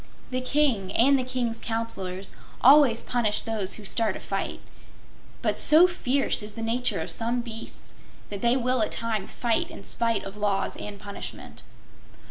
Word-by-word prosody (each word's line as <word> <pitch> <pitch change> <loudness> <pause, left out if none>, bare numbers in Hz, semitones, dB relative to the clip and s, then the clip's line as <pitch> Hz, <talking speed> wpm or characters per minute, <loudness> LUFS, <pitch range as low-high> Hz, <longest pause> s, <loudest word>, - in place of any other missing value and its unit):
The 255 0 -1
King 255 -8 +1
and 275 +4 +5
the - - 0
King's 245 -3 -2
Counselors 195 -5 -3 0.3
always 270 -3 +6
punish 225 -4 0
those 215 -4 -2
who 210 - -10
start 215 0 0
a - - -11
fight, 195 0 -3 0.8
but - - 0
so 315 +4 +7
fierce 280 -9 0
is 210 0 -7
the 225 - -5
nature 240 +2 0
of - - -4
some 235 +2 -1
beasts 230 -1 -9 0.4
that 200 -1 -5
they 240 +2 +3
will 255 -1 +1
at 215 - 0
times 220 -4 -1
fight 235 -2 0
in - - -10
spite 230 -2 0
of 195 +1 -8
laws 205 -2 0
and 205 -1 -7
punishment. 200 0 -8
230 Hz, 165 wpm, -26 LUFS, 210-250 Hz, 0.8 s, so